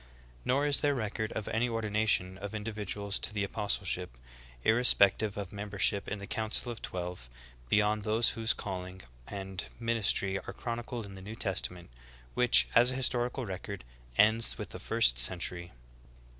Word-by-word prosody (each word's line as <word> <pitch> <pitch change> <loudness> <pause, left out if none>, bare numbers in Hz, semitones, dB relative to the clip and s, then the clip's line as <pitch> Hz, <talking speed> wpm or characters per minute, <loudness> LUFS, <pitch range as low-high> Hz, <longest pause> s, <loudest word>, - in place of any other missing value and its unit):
Nor 140 +3 +1
is 145 -1 +4
there 145 -1 +2
record 110 -2 -3
of 105 - -4
any 120 +2 0
ordination 105 -4 0
of 100 +2 -6
individuals 105 -2 -3
to - - -1
the 105 -1 -2
apostleship, 95 - -2 0.5
irrespective 110 -3 +5
of 100 -1 -6
membership 100 0 0
in 105 - -3
the 100 - -7
council 110 +3 -1
of 115 - -9
twelve, 90 -8 -6 0.4
beyond 105 +3 +2
those 110 +2 +1
whose 115 0 0
calling 95 -3 -6 0.2
and 95 -2 -6
min 115 -1 -1
istry 95 -2 +1
are - - -5
chronicled 120 -1 -5
in 100 - -10
the 95 - -10
New 105 +4 -8
Testament, 90 - -3 0.4
which, 125 -1 +5
as 120 +1 +6
a 130 - 0
historical 125 0 0
record, 95 0 -6 0.3
ends 110 +2 +4
v/ith - - -7
the - - -8
first - - +3
century. 85 +5 +3
105 Hz, 155 wpm, -30 LUFS, 95-115 Hz, 0.5 s, as